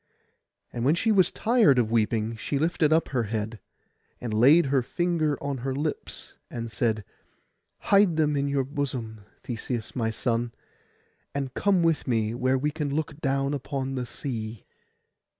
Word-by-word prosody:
And 120 - -3
when 145 +6 +4
she 220 +5 +1
was 190 -4 +5
tired 220 - +3
of 115 -3 +2
weeping, 115 0 +1
she 140 +5 -2
lifted 160 0 +2
up 160 +1 +3
her 125 -4 0
head, 110 +1 -3 0.6
and 120 -3 -4
laid 140 +10 +6
her 135 -1 +2
finger 160 +2 0
on 140 -2 -2
her 130 +2 -2
lips, 150 +2 -4 0.2
and 115 -1 -5
said, 110 -3 0 0.7
'Hide 200 -5 +3
them 150 -2 +2
in 140 0 0
your 140 -1 +1
bosom, 130 -6 -4 0.2
Theseus 120 -1 -4
my 115 -3 0
son, 115 +1 -1 0.8
and 135 -2 -2
come 195 -4 +2
with 165 -3 +1
me 110 -3 +1
where 130 +2 +1
we 150 +3 0
can 150 -1 -3
look 150 0 -3
down 135 0 0
upon 135 -1 -3
the 125 -2 -3
sea. 115 - -5
135 Hz, 160 wpm, -26 LUFS, 115-150 Hz, 0.8 s, laid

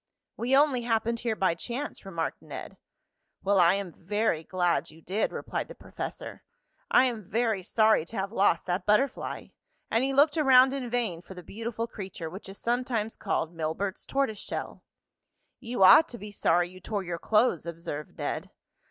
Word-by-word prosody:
"We 255 +4 +2
only 280 -4 +3
happened 230 0 0
here 225 -2 -1
by 190 -4 +2
chance," 240 - -5
remarked 165 -4 -3
Ned. - - -8 0.7
"Well, 195 0 +3
I 175 +1 +6
am 200 -3 -4
very 190 -2 -1
glad 175 0 0
you 155 - -15
did," 190 +6 -1
replied - - -4
the - - -10
professor. - - -7 0.5
"I - - +6
am 225 -7 -3
very 220 -2 +1
sorry 215 -1 +3
to 225 - -8
have 195 +1 -2
lost 195 -6 +2
that 180 +3 -2
butterfly," 235 +6 0 0.4
and 225 +3 +2
he 270 - +1
looked 290 +3 +4
around 265 -3 +6
in 260 -3 -3
vain 225 -9 -1
for 190 - -12
the 180 - -9
beautiful 230 +4 -4
creature, 190 -7 -7
which 190 +2 -9
is 195 - -9
sometimes 235 -2 -1
called 165 - -2
Milbert's 165 +4 -3
tortoise 270 -7 0
shell. - - -5 0.8
"You 240 -5 0
ought 305 - +9
to 240 - -9
be 210 -1 -8
sorry 175 -3 +2
you 185 +1 -13
tore 200 +1 -3
your 170 -2 -4
clothes," 215 -6 +2
observed 165 -3 -6
Ned. - - -3
210 Hz, 175 wpm, -28 LUFS, 180-240 Hz, 0.8 s, ought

